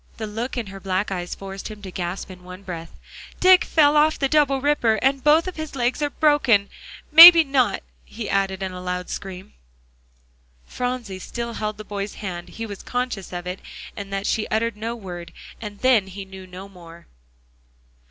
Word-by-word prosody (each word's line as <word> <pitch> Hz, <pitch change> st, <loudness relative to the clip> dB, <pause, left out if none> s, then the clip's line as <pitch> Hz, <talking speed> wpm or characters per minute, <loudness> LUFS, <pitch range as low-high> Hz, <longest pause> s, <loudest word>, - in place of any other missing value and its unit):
The 220 Hz, -, -4 dB
look 225 Hz, +5 st, -5 dB
in 240 Hz, -, -2 dB
her 195 Hz, 0 st, -10 dB
black 190 Hz, +1 st, -2 dB
eyes 175 Hz, -2 st, -4 dB
forced 195 Hz, 0 st, -8 dB
him 215 Hz, -1 st, -10 dB
to 190 Hz, -, -7 dB
gasp 180 Hz, +2 st, -5 dB
in 180 Hz, -1 st, -13 dB
one 180 Hz, +2 st, -11 dB
breath, 170 Hz, -3 st, -7 dB, 0.5 s
"Dick 370 Hz, 0 st, +6 dB
fell 295 Hz, -2 st, +3 dB
off 305 Hz, +1 st, +4 dB
the 275 Hz, -, +1 dB
double 280 Hz, -2 st, +2 dB
ripper, 265 Hz, -5 st, +2 dB
and 265 Hz, +5 st, 0 dB
both 310 Hz, +4 st, +4 dB
of 370 Hz, -, -6 dB
his 315 Hz, -2 st, -6 dB
legs 250 Hz, +3 st, -1 dB
are 295 Hz, -, +1 dB
broken 270 Hz, -10 st, +3 dB, 0.4 s
may 330 Hz, +3 st, +13 dB
be 335 Hz, -2 st, +4 dB
not," 260 Hz, -8 st, +1 dB, 0.2 s
he 220 Hz, -1 st, -7 dB
added 195 Hz, -1 st, -1 dB
in 190 Hz, -, -3 dB
a 180 Hz, 0 st, -8 dB
loud 180 Hz, 0 st, -4 dB
scream. 190 Hz, -1 st, -7 dB, 1.1 s
Phronsie 245 Hz, -6 st, -4 dB
still 235 Hz, +4 st, -5 dB
held 215 Hz, -1 st, -4 dB
the 215 Hz, -, -8 dB
boy's 205 Hz, 0 st, -5 dB
hand. 175 Hz, -3 st, -6 dB
He 225 Hz, -, -6 dB
was 205 Hz, -3 st, -8 dB
conscious 245 Hz, -6 st, -4 dB
of 175 Hz, -1 st, -6 dB
it, 180 Hz, +1 st, -5 dB, 0.4 s
and 200 Hz, -1 st, -7 dB
that 195 Hz, 0 st, -3 dB
she 215 Hz, 0 st, 0 dB
uttered 225 Hz, 0 st, -1 dB
no 225 Hz, +3 st, -4 dB
word, 180 Hz, -6 st, -9 dB, 0.3 s
and 210 Hz, -2 st, -7 dB
then 245 Hz, -7 st, +3 dB
he 195 Hz, +1 st, -8 dB
knew 190 Hz, -1 st, -11 dB
no 185 Hz, +2 st, -10 dB
more. 170 Hz, -3 st, -14 dB
210 Hz, 190 wpm, -22 LUFS, 190-255 Hz, 1.1 s, may